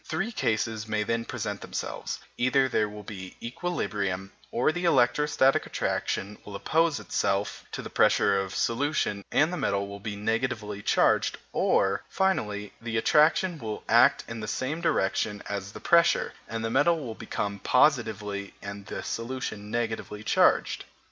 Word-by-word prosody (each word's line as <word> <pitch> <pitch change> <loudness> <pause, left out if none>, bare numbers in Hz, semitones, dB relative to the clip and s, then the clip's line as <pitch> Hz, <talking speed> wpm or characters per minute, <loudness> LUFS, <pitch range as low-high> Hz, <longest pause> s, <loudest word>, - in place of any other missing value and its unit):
Three 220 +4 -2
cases 110 - -1
may 110 -1 0
then 115 +1 -1
present - - -4
themselves - - -4 0.2
either 130 +2 +3
there 110 -4 +1
will 105 0 -9
be 95 -3 -8
equilibrium, 105 - -3 0.2
or 125 +6 +2
the 175 +2 -3
electrostatic 135 -1 +3
attraction 100 +2 -2
will 105 - -9
oppose 160 +8 +1
itself 100 +1 -1
to - - -4
the - - -7
pressure 100 -1 +4
of 95 -1 -6
solution 115 -5 0
and 160 +4 +3
the - - -2
metal 100 -6 0
will 100 0 -8
be 105 0 -5
negatively 105 -1 -2
charged, - - +2 0.2
or, 100 +1 +2
finally, 105 - 0
the 115 -1 -2
attraction 155 +7 +3
will 110 -2 -5
act - - +5
in 115 0 -6
the 105 - -5
same 135 +9 -2
direction 105 - 0
as 100 -1 -4
the - - -9
pressure, 170 -1 +3
and 115 0 -3
the 115 - -2
metal 165 +6 +3
will 125 -7 -5
become 100 -2 -4
positively 105 -6 +1
and 100 0 -8
the - - -5
solution 115 -3 -4
negatively 110 -2 -3
charged. - - +3
110 Hz, 155 wpm, -27 LUFS, 100-130 Hz, 0.2 s, act